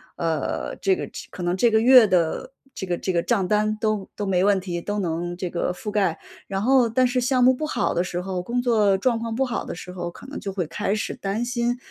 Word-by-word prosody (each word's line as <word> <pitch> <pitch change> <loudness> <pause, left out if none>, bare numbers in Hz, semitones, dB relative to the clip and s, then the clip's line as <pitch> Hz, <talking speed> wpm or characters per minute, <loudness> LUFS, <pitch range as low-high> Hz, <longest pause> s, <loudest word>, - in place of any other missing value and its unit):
呃， 165 -2 -2
这 385 -1 +2
个 - - -4
这 - - -9
可 180 - -7
能 175 +1 0
这 235 - +4
个 220 0 +3
月 250 -2 +8
的 180 +8 0 0.2
这 190 - -6
个 175 -1 -1
这 190 - -2
个 170 -2 +1
账 205 -3 +1
单 215 0 +2
都 215 -3 0
都 205 - -3
没 185 -1 +2
问 200 -2 +3
题， 175 -2 -4
都 205 +4 -3
能 175 0 -2
这 180 -1 -4
个 175 +1 -1
覆 210 +3 -6
盖。 195 -6 +1 0.3
然 195 0 -2
后， 255 +1 +4
但 255 +3 +2
是 250 +1 +1
项 250 0 +2
目 255 +1 +6
不 305 +5 -3
好 - - 0
的 175 - +1
时 180 -1 -3
候， 185 -1 -3
工 240 +7 -1
作 215 -5 +3
状 235 +3 +1
况 230 -1 -4
不 265 - +1
好 245 -3 -2
的 - - -6
时 180 +2 -9
候， 175 -1 -4
可 - - -13
能 280 - -6
就 195 -2 -5
会 180 -3 -1
开 195 +5 -2
始 215 - -3
担 200 +4 -3
心， 240 0 -1
205 Hz, 275 characters per minute, -24 LUFS, 180-240 Hz, 0.3 s, 月